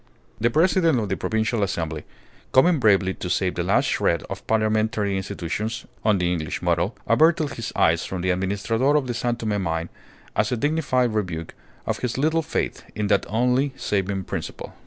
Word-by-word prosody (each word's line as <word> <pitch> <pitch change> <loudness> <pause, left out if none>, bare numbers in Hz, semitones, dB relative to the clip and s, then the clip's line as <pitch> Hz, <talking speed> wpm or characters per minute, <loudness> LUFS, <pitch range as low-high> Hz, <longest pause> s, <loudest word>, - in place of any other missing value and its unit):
The 115 - +3
President 165 +1 +3
of 105 -3 -2
the 95 - 0
Provincial 110 +2 -1
Assembly, 80 -5 -2 0.5
coming 155 +5 +5
bravely 100 -5 +3
to 90 - -6
save 90 0 +1
the 85 - -2
last 90 +3 +2
shred 85 -1 +1
of - - -7
parliamentary 110 -2 +1
institutions 95 +4 -3 0.2
(on 105 -2 +3
the 90 -1 0
English 80 -3 -3
model), - - 0
averted 155 +5 +3
his 115 - -5
eyes 80 +1 +3
from 95 -2 -4
the 95 - +2
Administrador 100 +9 +1
of 145 -3 +2
the 125 - -2
San 120 0 -1
Tome 110 -4 -2
mine 80 -1 -2 0.5
as - - +1
a 125 - 0
dignified 130 -4 +1
rebuke 90 -6 -3 0.3
of - - -2
his 125 -1 -2
little 160 +4 +2
faith 155 - -2
in 105 -1 -1
that 100 -2 +2
only 125 +5 +1
saving 100 -1 -1
principle. - - -6
110 Hz, 180 wpm, -24 LUFS, 95-125 Hz, 0.5 s, coming